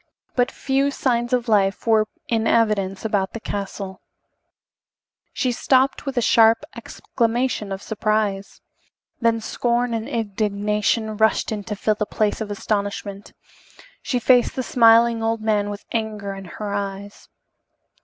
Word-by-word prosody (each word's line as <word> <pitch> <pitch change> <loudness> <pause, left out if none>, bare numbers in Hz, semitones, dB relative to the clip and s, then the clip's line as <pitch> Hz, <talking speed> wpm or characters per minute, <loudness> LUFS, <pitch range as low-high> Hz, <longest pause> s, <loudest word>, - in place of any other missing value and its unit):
But 245 -1 +2
few 275 +1 0
signs 240 -3 -1
of 250 -1 0
life 200 -3 +2
were 220 -2 +3 0.2
in 225 -1 0
evidence 210 -4 +1
about 200 -3 0
the 230 - -5
castle. 195 -2 -5 1.3
She 255 - -1
stopped 265 +3 +1
with 270 -1 -4
a 245 - +2
sharp 225 +3 +5
exclamation 235 -3 -2
of 195 +1 -5
surprise. 215 -2 -1 0.6
Then 230 -1 +2
scorn 240 +2 -1
and 225 +3 -3
indignation 210 -1 -1
rushed 220 +1 +2
in 210 -2 -3
to 210 - -4
fill 215 +2 +1
the 210 0 -3
place 215 +1 -1
of 215 - -4
astonishment. 205 -1 -3 0.7
She 250 - -1
faced 245 0 +3
the 260 - -2
smiling 230 -1 +5
old 225 0 -1
man 210 -2 +1
with 205 0 -7
anger 215 -3 -3
in 195 0 -9
her 205 +3 -6
eyes. 200 0 -6
220 Hz, 140 wpm, -22 LUFS, 205-235 Hz, 1.3 s, sharp